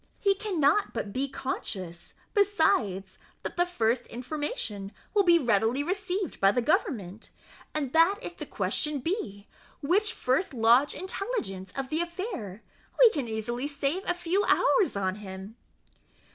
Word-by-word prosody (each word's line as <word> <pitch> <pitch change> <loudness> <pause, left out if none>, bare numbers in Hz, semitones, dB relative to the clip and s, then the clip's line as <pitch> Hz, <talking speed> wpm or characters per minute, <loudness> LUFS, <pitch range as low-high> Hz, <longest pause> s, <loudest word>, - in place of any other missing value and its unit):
He 400 -1 +4
cannot 390 -3 +1
but 200 - -3
be 275 +3 -1
conscious, 185 -10 -5 0.2
besides, 230 - +2 0.2
that - - -5
the 350 0 +2
first 240 -7 0
information 240 -6 -4 0.2
will 415 - +5
be 345 -3 +6
readily 235 -1 +2
received 375 +1 -2
by 195 0 +5
government, 245 - 0 0.5
and 280 -4 -2
that 330 +5 +5
if - - -7
the - - -7
question 300 -1 0
be, 250 - -3 0.4
which 385 +9 +3
can 450 - -5
first 265 +4 0
lodge 235 +5 +4
intelligence 295 - -4
of 270 -1 -3
the 315 +3 0
affair, 340 - -5 0.3
we 485 -3 +8
can 280 - -3
easily 235 +4 -3
save 285 +4 -1
a 355 - +1
few 355 +3 0
hours 405 - +3
on 190 -1 -1
him." 190 +2 -8
280 Hz, 145 wpm, -28 LUFS, 220-365 Hz, 0.5 s, we